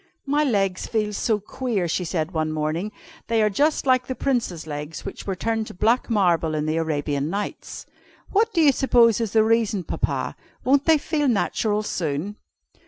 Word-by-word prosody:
"My 290 Hz, +2 st, +2 dB
legs 195 Hz, -8 st, 0 dB
feel 215 Hz, -2 st, -1 dB
so 215 Hz, +1 st, 0 dB
queer," 210 Hz, -3 st, -2 dB
she 180 Hz, +2 st, -1 dB
said 160 Hz, 0 st, -2 dB
one 155 Hz, -2 st, -1 dB
morning, 155 Hz, +6 st, -2 dB, 0.4 s
"they 230 Hz, -1 st, +1 dB
are 210 Hz, -, +2 dB
just 295 Hz, +10 st, +1 dB
like 255 Hz, -1 st, +3 dB
the 260 Hz, -, -3 dB
Prince's 235 Hz, -, -1 dB
legs 150 Hz, 0 st, -6 dB
which -, -, -7 dB
were 195 Hz, -, -1 dB
turned 225 Hz, +3 st, -1 dB
to -, -, -10 dB
black 230 Hz, +8 st, +2 dB
marble 175 Hz, -7 st, +2 dB
in 150 Hz, 0 st, -1 dB
the 155 Hz, +1 st, 0 dB
Arabian 145 Hz, -2 st, -1 dB
Nights. 200 Hz, +3 st, -5 dB, 0.5 s
What 445 Hz, +3 st, +2 dB
do 345 Hz, -5 st, +2 dB
you 295 Hz, -3 st, +6 dB
suppose 240 Hz, -4 st, +4 dB
is 225 Hz, -4 st, -2 dB
the 220 Hz, -1 st, +5 dB
reason, 220 Hz, -3 st, +1 dB
Papa? -, -, -2 dB, 0.3 s
Won't 275 Hz, +2 st, +3 dB
they 320 Hz, -1 st, +5 dB
feel 295 Hz, 0 st, -1 dB
natural 215 Hz, -2 st, +1 dB
soon?" 170 Hz, +2 st, -3 dB
210 Hz, 180 wpm, -23 LUFS, 165-250 Hz, 0.5 s, you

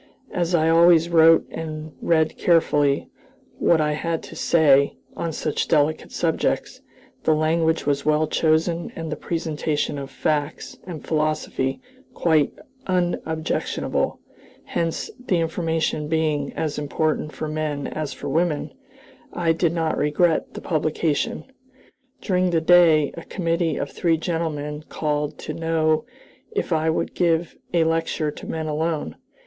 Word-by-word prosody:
As 175 Hz, 0 st, 0 dB
I 160 Hz, -1 st, +3 dB
always 165 Hz, 0 st, +5 dB
wrote 165 Hz, -1 st, +6 dB
and 155 Hz, -1 st, -6 dB
read 160 Hz, -2 st, +2 dB
carefully 145 Hz, -5 st, +2 dB, 0.5 s
what 170 Hz, -, +4 dB
I 150 Hz, -1 st, +1 dB
had 165 Hz, +2 st, -2 dB
to -, -, -10 dB
say 140 Hz, -4 st, +4 dB, 0.2 s
on 165 Hz, -, -3 dB
such -, -, -2 dB
delicate 155 Hz, 0 st, +1 dB
subjects, -, -, -1 dB, 0.4 s
the 155 Hz, -, +3 dB
language 160 Hz, +1 st, +1 dB
was 140 Hz, -1 st, 0 dB
well 155 Hz, +1 st, +2 dB
chosen 165 Hz, +2 st, +1 dB
and 165 Hz, -1 st, -5 dB
the -, -, -1 dB
presentation 155 Hz, -3 st, -2 dB
of 135 Hz, -1 st, -6 dB
facts 150 Hz, +2 st, -2 dB
and 165 Hz, -4 st, -7 dB
philosophy 155 Hz, -, -1 dB, 0.3 s
quite 155 Hz, -4 st, +3 dB, 0.4 s
unobjectionable; 175 Hz, -3 st, -1 dB, 0.4 s
hence, 165 Hz, -1 st, -2 dB
the 185 Hz, -7 st, +1 dB
information 165 Hz, -2 st, -1 dB
being 155 Hz, -3 st, 0 dB
as 150 Hz, -2 st, -2 dB
important 150 Hz, +1 st, -1 dB
for 155 Hz, -, -5 dB
men 155 Hz, -2 st, -2 dB
as 155 Hz, -2 st, -4 dB
for -, -, -7 dB
women, 155 Hz, +1 st, 0 dB, 0.6 s
I 170 Hz, -2 st, +1 dB
did 165 Hz, 0 st, +1 dB
not 165 Hz, -2 st, -1 dB
regret 155 Hz, +3 st, +1 dB
the -, -, -6 dB
publication. 160 Hz, +6 st, -1 dB, 0.8 s
During 185 Hz, -2 st, +1 dB
the 170 Hz, -2 st, +2 dB
day 160 Hz, -3 st, +5 dB
a 170 Hz, -, -6 dB
committee 165 Hz, -3 st, -1 dB
of 140 Hz, -, -3 dB
three 165 Hz, -2 st, +1 dB
gentlemen 155 Hz, -3 st, -3 dB
called 150 Hz, -1 st, -2 dB
to -, -, -6 dB
know 160 Hz, +2 st, +1 dB, 0.5 s
if 410 Hz, -, 0 dB
I 160 Hz, 0 st, +1 dB
would 160 Hz, -, -1 dB
give 170 Hz, -1 st, +1 dB, 0.2 s
a 170 Hz, -2 st, +3 dB
lecture 165 Hz, -1 st, 0 dB
to -, -, -10 dB
men 160 Hz, -1 st, -3 dB
alone. 155 Hz, -, -2 dB
160 Hz, 135 wpm, -23 LUFS, 150-165 Hz, 0.8 s, wrote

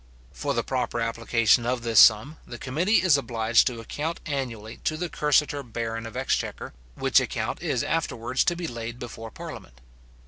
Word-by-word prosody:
For -, -, -3 dB
the -, -, 0 dB
proper -, -, -2 dB
application 115 Hz, 0 st, +2 dB
of 120 Hz, 0 st, -1 dB
this 115 Hz, -2 st, +4 dB
sum, 125 Hz, +8 st, +6 dB
the 120 Hz, -, -7 dB
committee 170 Hz, -, +1 dB
is 170 Hz, -6 st, +5 dB
obliged 115 Hz, -3 st, +2 dB
to 120 Hz, -3 st, -3 dB
account 150 Hz, +8 st, -4 dB
annually 120 Hz, -7 st, -4 dB
to 155 Hz, -, -2 dB
the 175 Hz, +1 st, -3 dB
cursitor 150 Hz, -1 st, +1 dB
baron 115 Hz, -2 st, -4 dB
of 115 Hz, -, -8 dB
exchequer; -, -, -2 dB, 0.2 s
which -, -, +4 dB
account -, -, -3 dB
is -, -, -1 dB
afterwards 120 Hz, +3 st, -1 dB
to 175 Hz, -, +2 dB
be 170 Hz, 0 st, -5 dB
laid 115 Hz, -4 st, -5 dB
before 115 Hz, -2 st, -8 dB
parliament. 65 Hz, -, -10 dB
120 Hz, 170 wpm, -26 LUFS, 115-145 Hz, 0.2 s, sum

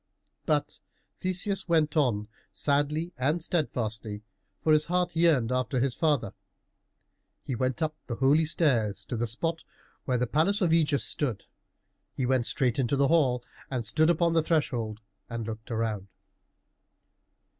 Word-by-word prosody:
But -, -, 0 dB, 0.4 s
Theseus 185 Hz, +1 st, -1 dB
went 155 Hz, -2 st, +2 dB
on 115 Hz, -9 st, +1 dB, 0.2 s
sadly 150 Hz, +4 st, 0 dB
and 150 Hz, +6 st, +1 dB
steadfastly, 115 Hz, -, -2 dB, 0.4 s
for 155 Hz, -, +4 dB
his 155 Hz, 0 st, +4 dB
heart 180 Hz, 0 st, 0 dB
yearned 155 Hz, -8 st, +3 dB
after 130 Hz, +1 st, 0 dB
his 130 Hz, 0 st, +1 dB
father. 150 Hz, -3 st, 0 dB, 1.1 s
He 135 Hz, -, -4 dB
went 130 Hz, +5 st, -1 dB
up 155 Hz, 0 st, -1 dB
the 120 Hz, -, -3 dB
holy 140 Hz, +6 st, +3 dB
stairs 115 Hz, -, +1 dB
to -, -, -4 dB
the 120 Hz, +1 st, -1 dB
spot 165 Hz, +9 st, -2 dB, 0.4 s
where 130 Hz, -2 st, +1 dB
the 125 Hz, -, +1 dB
palace 160 Hz, -, +2 dB
of 180 Hz, -6 st, +2 dB
Ægeus 155 Hz, -4 st, +3 dB
stood. 125 Hz, -9 st, -1 dB, 0.7 s
He 130 Hz, -, -1 dB
went 125 Hz, -2 st, +1 dB
straight 125 Hz, -1 st, 0 dB
into 130 Hz, +1 st, +1 dB
the 140 Hz, 0 st, +2 dB
hall 130 Hz, -7 st, +3 dB, 0.3 s
and 125 Hz, -4 st, -3 dB
stood 155 Hz, +8 st, +3 dB
upon 170 Hz, 0 st, +2 dB
the 165 Hz, -, +4 dB
threshold 120 Hz, -9 st, -1 dB, 0.3 s
and 115 Hz, -1 st, -4 dB
looked 110 Hz, 0 st, -7 dB
round. 110 Hz, -4 st, -2 dB
140 Hz, 145 wpm, -28 LUFS, 120-160 Hz, 1.1 s, for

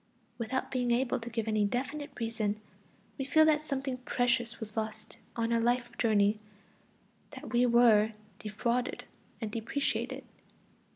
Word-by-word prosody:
Without 245 Hz, +3 st, -2 dB
being 250 Hz, -2 st, 0 dB
able 245 Hz, +1 st, +2 dB
to 235 Hz, 0 st, -7 dB
give 225 Hz, -1 st, -2 dB
any 215 Hz, -1 st, +2 dB
definite 270 Hz, +7 st, -2 dB
reason, 220 Hz, -2 st, -1 dB, 0.6 s
we -, -, 0 dB
feel 315 Hz, +4 st, +5 dB
that 305 Hz, -1 st, +2 dB
something 270 Hz, -2 st, -2 dB
precious 245 Hz, -2 st, 0 dB
was 215 Hz, -2 st, -7 dB
lost 220 Hz, -1 st, -4 dB, 0.2 s
on 230 Hz, 0 st, 0 dB
our 230 Hz, -, +3 dB
life 240 Hz, +1 st, 0 dB
journey, 210 Hz, -2 st, +3 dB, 1.0 s
that -, -, -9 dB
we 245 Hz, +1 st, +4 dB
were 225 Hz, -2 st, +5 dB, 0.3 s
defrauded 235 Hz, +4 st, -1 dB, 0.4 s
and 220 Hz, -2 st, -3 dB
depreciated. 230 Hz, +6 st, -2 dB
235 Hz, 135 wpm, -31 LUFS, 220-255 Hz, 1.0 s, feel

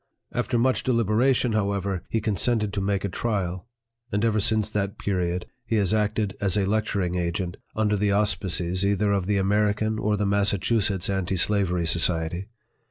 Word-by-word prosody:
After 120 Hz, 0 st, 0 dB
much 130 Hz, +2 st, +2 dB
deliberation, 120 Hz, +1 st, +2 dB
however, 100 Hz, -3 st, -1 dB
he 115 Hz, -, 0 dB
consented 105 Hz, 0 st, 0 dB
to 100 Hz, -, -1 dB
make 100 Hz, 0 st, -1 dB
a -, -, +1 dB
trial; 95 Hz, -2 st, -3 dB, 0.4 s
and 105 Hz, +2 st, +1 dB
ever 110 Hz, -1 st, +2 dB
since 110 Hz, 0 st, +1 dB
that 100 Hz, -1 st, -2 dB
period, 90 Hz, -2 st, -1 dB, 0.2 s
he 115 Hz, -1 st, -2 dB
has 100 Hz, -2 st, +2 dB
acted 105 Hz, -1 st, 0 dB
as 100 Hz, -1 st, +1 dB
a 100 Hz, -, +2 dB
lecturing 100 Hz, -3 st, 0 dB
agent, 90 Hz, 0 st, -2 dB, 0.2 s
under 105 Hz, -1 st, +1 dB
the 105 Hz, 0 st, +1 dB
auspices 95 Hz, -3 st, 0 dB
either 100 Hz, +1 st, +2 dB
of 95 Hz, -2 st, 0 dB
the 105 Hz, -1 st, +1 dB
American 105 Hz, +2 st, +1 dB
or 105 Hz, -1 st, 0 dB
the 105 Hz, -, 0 dB
Massachusetts 100 Hz, -1 st, +1 dB
Anti 95 Hz, -1 st, -1 dB
Slavery 90 Hz, -3 st, +1 dB
Society. 85 Hz, +2 st, +1 dB
100 Hz, 165 wpm, -25 LUFS, 95-110 Hz, 0.4 s, much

